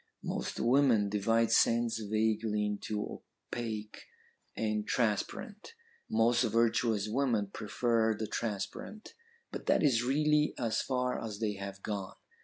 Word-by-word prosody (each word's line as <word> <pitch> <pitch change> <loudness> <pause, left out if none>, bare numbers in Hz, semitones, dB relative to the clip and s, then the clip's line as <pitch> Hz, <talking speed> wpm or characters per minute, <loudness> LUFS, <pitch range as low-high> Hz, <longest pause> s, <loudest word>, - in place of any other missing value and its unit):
Most - - -3
women 120 -4 +4
divide 115 +3 +2
scents 115 -1 +3
vaguely 110 0 0
into 105 0 -4 0.3
opaque 110 -3 -5 0.5
and 105 -1 -1
transparent; 200 - -2 0.3
most 115 +2 +3
virtuous 115 -2 +2
women 110 -4 0
prefer 110 0 +1
the 110 - -3
transparent. 115 - -5 0.4
But - - -7
that - - +3
is 125 -6 +4
really 150 +3 +2
as 115 -3 0
far 125 -1 -1
as 110 -3 -5
they 105 -1 -1
have 100 0 -7
gone. 100 0 -4
115 Hz, 120 wpm, -32 LUFS, 105-120 Hz, 0.5 s, women